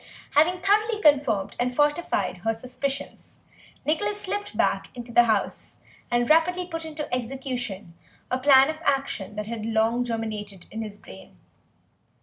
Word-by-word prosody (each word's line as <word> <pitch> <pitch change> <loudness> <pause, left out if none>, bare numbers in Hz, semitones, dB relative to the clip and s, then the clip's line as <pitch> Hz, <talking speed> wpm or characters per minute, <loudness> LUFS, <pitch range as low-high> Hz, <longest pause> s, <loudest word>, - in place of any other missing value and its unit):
Having 350 +5 +3
thoroughly 425 +3 +2
confirmed 265 - +3
and 250 0 0
fortified 295 - +1
her 225 +5 -1
suspicions 265 +4 -5 0.5
Nicholas 410 +7 0
slipped 410 +1 -4
back - - +1
into 240 0 -7
the 240 0 +6
house 215 -3 -1 0.3
and 240 0 +1
rapidly 355 +3 +3
put 330 -2 -5
into 305 -1 -5
execution 245 -7 -4 0.4
a 255 - +1
plan 270 +1 +6
of 315 0 -11
action 270 -9 -1
that 210 0 -3
had 225 0 -5
long 225 +2 +1
germinated 215 -5 -4
in 220 - -4
his 210 -2 -7
brain. 95 - -14
250 Hz, 140 wpm, -25 LUFS, 220-310 Hz, 0.5 s, the